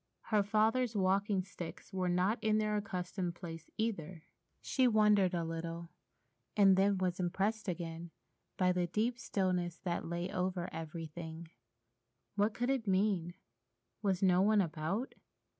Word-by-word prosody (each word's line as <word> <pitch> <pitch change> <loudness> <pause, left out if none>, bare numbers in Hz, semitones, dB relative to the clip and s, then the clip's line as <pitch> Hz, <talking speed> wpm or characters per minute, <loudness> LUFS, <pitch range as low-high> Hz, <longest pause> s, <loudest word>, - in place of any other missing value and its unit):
Her 210 -1 +5
father's 220 +3 +2
walking 195 0 +2
sticks 180 -3 -9
were 185 -1 0
not 185 +7 +1
in 215 -1 +3
their 215 -1 +1
accustomed 180 -3 -3
place 165 -2 -8
either. 185 -7 -3 0.4
She 260 -2 +2
wondered 210 -5 +4
a 170 - 0
little, 165 +1 -5 0.7
and 195 -2 +7
then 195 +1 +3
was 185 -1 -1
impressed 195 +5 -1
again 170 -1 -4 0.5
by 180 -1 +3
the 180 -1 0
deep 230 +7 0
stillness 180 -5 -1
that 175 -2 -2
lay 175 +1 -2
over 180 -1 -2
everything. 160 0 -6 0.8
What 205 +1 +1
could 245 +2 0
it 255 -5 -1
mean? 185 -3 +1 0.7
Was 195 -2 +1
no 185 -1 +5
one 210 +2 +4
about? 180 +7 -1
185 Hz, 140 wpm, -34 LUFS, 175-210 Hz, 0.8 s, and